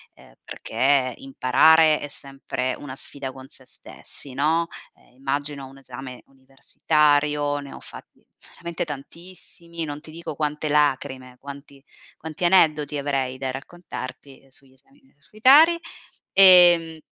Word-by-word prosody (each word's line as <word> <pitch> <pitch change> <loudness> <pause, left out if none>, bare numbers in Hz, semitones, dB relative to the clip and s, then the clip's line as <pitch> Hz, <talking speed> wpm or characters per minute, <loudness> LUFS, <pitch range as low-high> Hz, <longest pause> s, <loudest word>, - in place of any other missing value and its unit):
ehm, - - -20
perché 130 +1 -1
imparare 155 +4 +3
è 145 - -6
sempre 135 -2 -5
una 130 -3 -9
sfida 135 -1 -8
con 130 0 -13
se 130 - -15
stessi, 135 +1 -10
no: 160 +5 0 0.3
ehm, 120 - -27
immagino 140 +1 -4
un 135 - -16
esame 130 -1 -11
universitario, 145 +2 0
ne 140 -1 -10
ho - - -10
fatti - - -15 0.3
veramente 170 0 -5
tantissimi, 170 +3 -10
non 145 0 -7
ti 155 - -14
dico 165 -2 -8
quante 150 0 -3
lacrime, 130 -3 -1
quanti 140 0 -12 0.3
quanti 160 +2 -5
aneddoti 155 -5 +2
avrei 135 -2 -3
da 130 0 -4
raccontarti 135 -2 -10
sugli 130 0 -21
esami 270 - -27
universitari; 265 - +3 0.6
ehm, 175 -4 +7
145 Hz, 125 wpm, -23 LUFS, 135-160 Hz, 0.6 s, ehm